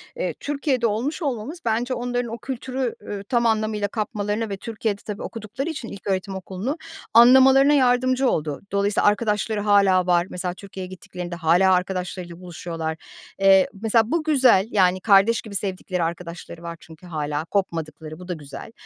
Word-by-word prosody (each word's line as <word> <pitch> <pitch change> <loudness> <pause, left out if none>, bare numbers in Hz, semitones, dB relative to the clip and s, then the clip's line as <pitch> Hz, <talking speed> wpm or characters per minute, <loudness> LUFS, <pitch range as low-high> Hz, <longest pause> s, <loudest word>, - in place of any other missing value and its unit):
eee, - - -2
Türkiye'de 280 -4 0
olmuş 240 - -2
olmamız 275 +2 -3
bence 235 +3 0
onların 245 -1 -2
o - - -4
kültürü, 260 -1 -4
ü 200 -1 -6
tam 235 -1 +2
anlamıyla 215 -2 +1
kapmalarına 210 0 -2
ve 195 - -4
Türkiye'de, 215 -1 -3
tabii, 210 -2 -6
okudukları 230 +6 -5
için 300 -7 -5
ilköğretim 195 -1 -3
okulunu 190 - -4 0.4
anlamalarına 265 +4 +7
yardımcı 255 -1 +3
oldu. 150 -2 -2
Dolayısıyla 200 +1 +2
arkadaşları 210 0 +1
hâlâ 200 -3 +4
var. 175 0 +3
Mesela 180 0 -3
Türkiye'ye 190 -1 -8
gittiklerinde 180 -1 -7
hâlâ 175 +3 +4
arkadaşlarıyla 180 -1 -3
buluşuyorlar. 165 -2 -5 0.4
Eee, 195 -1 +6
mesela 225 0 +2
bu 335 -1 +1
güzel, 255 -10 +4
yani 185 -2 +3
kardeş 210 +3 +4
gibi 210 -3 -10
sevdikleri 185 -2 -2
arkadaşları 170 0 -6
var 170 0 -6
çünkü 160 +1 -15
hâlâ 150 -2 -3
kopmadıkları. 160 -4 -3
Bu 180 - -10
da 180 - -2
güzel. 150 +6 -9
205 Hz, 155 wpm, -23 LUFS, 180-235 Hz, 0.4 s, anlamalarına